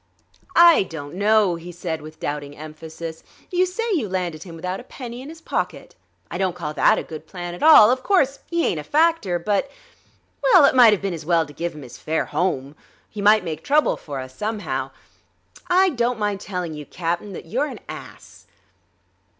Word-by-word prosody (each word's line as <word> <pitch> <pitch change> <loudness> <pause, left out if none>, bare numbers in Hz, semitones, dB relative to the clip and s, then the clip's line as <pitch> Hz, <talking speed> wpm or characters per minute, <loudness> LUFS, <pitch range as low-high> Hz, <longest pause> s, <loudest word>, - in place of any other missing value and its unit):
"I 340 -1 +8
don't 155 -6 -6
know," 205 -2 +3
he 170 +1 -9
said 170 -2 -4
with 155 +1 -12
doubting 145 -1 -5
emphasis. 160 +1 -8 0.3
"You 365 0 +2
say 370 +6 -3
you 260 - -1
landed 180 -4 -3
him 170 -1 -9
without 180 +3 -4
a - - -10
penny 245 -1 -8
in 275 - -9
his 325 0 -11
pocket? - - -3 0.4
I 175 - -4
don't 185 -2 0
call 155 -4 -5
that - - +4
a - - -2
good 155 0 -9
plan 175 0 -6
at 175 - -9
all. 275 -8 +8
Of 255 0 0
course, 280 -6 +2
he 340 -1 +1
ain't 160 - 0
a - - -6
factor, 310 - +2
but... 200 +8 -1 0.7
Well, 380 -12 +6
it - - +4
might've 225 -6 +6
been 195 -2 -1
as 165 -2 -6
well 165 0 +2
to 145 - -13
give 170 +1 -4
him 150 - -9
his 125 -1 -11
fare 160 +1 -1
home. 145 -6 -2 0.4
He 210 - -6
might 210 +2 +5
make 160 -2 -5
trouble 295 +1 +3
for 140 -3 -7
us, 130 0 -8
somehow.... 215 +3 -3 0.8
I 370 +1 +4
don't 245 -5 0
mind 205 -2 -1
telling 180 -5 -4
you, 150 -1 -8
Cap'n, 175 +4 -3
that - - -8
you're 255 - -1
an 250 -7 -8
ass." - - -11
185 Hz, 200 wpm, -22 LUFS, 160-250 Hz, 0.8 s, I